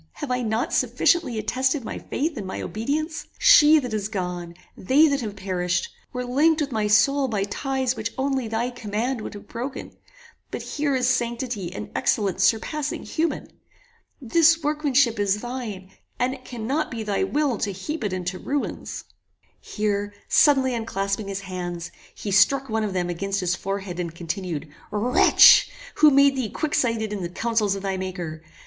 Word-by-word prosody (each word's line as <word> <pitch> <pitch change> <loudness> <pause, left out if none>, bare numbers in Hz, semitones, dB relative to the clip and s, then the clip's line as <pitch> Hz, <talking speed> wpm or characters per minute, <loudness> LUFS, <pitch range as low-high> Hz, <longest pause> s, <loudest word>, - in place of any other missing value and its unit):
Have 295 -4 -6
I 250 0 0
not 225 0 -1
sufficiently 335 -10 +2
attested 260 +4 0
my - - -5
faith 310 +3 -2
and 205 -6 -5
my 190 - -5
obedience? 305 +8 -3
She 315 -12 +7
that 250 -6 -2
is 210 -2 -1
gone, 180 -4 -4 0.2
they 280 +10 +4
that 280 -2 0
have 210 -3 -5
perished, 185 - -1 0.2
were 250 0 -4
linked 300 +6 +3
with 290 -2 -2
my 215 -3 0
soul 270 +7 +4
by 210 -5 -1
ties 260 +4 -1
which 225 0 -4
only 265 -2 -1
thy 225 +3 -1
command 235 +1 -3
would - - -7
have 205 - -11
broken; 255 +4 -6 0.6
but - - -5
here 290 -2 -1
is 250 -1 +1
sanctity 235 -6 -1
and 190 - -7
excellence 195 -3 +1
surpassing 290 +8 0
human. 325 0 -2 0.7
This 325 +5 +3
workmanship 285 -6 +2
is 205 0 +1
thine, 225 -7 -6 0.3
and 250 +1 0
it 255 -1 -12
cannot 255 +6 -2
be 230 -2 -5
thy 210 - 0
will 295 - 0
to 205 - -1
heap 290 - -5
it 205 - -1
into 185 0 -3
ruins." 285 0 -4 0.6
Here 205 -1 -2
suddenly 265 -3 +4
unclasping 200 -3 -2
his 195 0 -4
hands, 175 -2 -5 0.2
he 205 - -5
struck 265 +8 +4
one 220 0 0
of 205 -3 -2
them 175 -1 -1
against 195 +3 -2
his 180 -2 0
forehead, 195 -1 -4
and 170 -2 -4
continued 170 -2 -4 0.2
"Wretch! 225 +4 +6 0.3
who 305 - +7
made 280 0 +5
thee 255 -5 -2
quicksighted 230 -6 -1
in 200 - -4
the 170 - -3
councils 215 0 0
of 195 - -6
thy 195 -1 -1
Maker? 180 -4 -5
225 Hz, 170 wpm, -24 LUFS, 195-270 Hz, 0.7 s, She